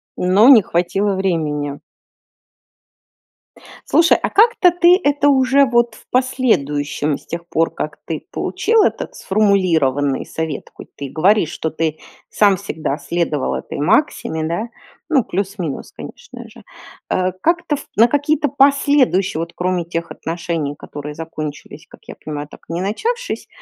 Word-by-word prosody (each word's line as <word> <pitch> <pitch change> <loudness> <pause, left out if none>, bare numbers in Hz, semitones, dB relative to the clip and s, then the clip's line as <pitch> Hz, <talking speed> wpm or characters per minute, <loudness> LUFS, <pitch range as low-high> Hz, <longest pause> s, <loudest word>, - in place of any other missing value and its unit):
Но 190 +6 +4
не 250 -6 +9
хватило 190 +4 0
времени. 150 -6 -2 2.1
Слушай, 335 +1 +5
а - - -1
как-то 440 -4 +4
ты 350 +2 +5
это 285 0 +2
уже, 270 +1 +4
вот, 240 -3 +1
в - - -18
последующем, 150 - 0
с - - -20
тех 170 +1 -6
пор 165 -1 0
как - - -5
ты - - -4
получил 450 -1 +1
этот - - -2
сформулированный 165 -10 +1
совет, 160 -3 -5
хоть - - -13
ты 140 - -5
и - - -7
говоришь, 180 +3 +2
что 160 - -3
ты 155 -1 -2 0.3
сам 200 -2 +3
всегда 160 -7 -4
следовал 155 -2 -2
этой - - -6
максиме, 160 - +1
да, 170 +9 -2 0.4
ну, 275 -7 +3
плюс-минус, 190 -5 -4
конечно 485 - -11
же. - - -16 0.5
Э, 185 0 0
как-то 335 -2 +1
ф 285 - -10
на 230 +3 +5
какие-то 290 +1 +1
последующие, 275 - +3
вот, 170 +1 -5
кроме 180 -1 -1
тех 170 0 -4
отношений, 165 -3 -4
которые 145 0 -8
закончились, 155 -1 -7
как - - -16
я - - -7
понимаю, 150 -1 -5
так - - -13
и 165 - -6
не 175 - -2
начавшись, 465 - -3
185 Hz, 145 wpm, -18 LUFS, 155-265 Hz, 2.1 s, не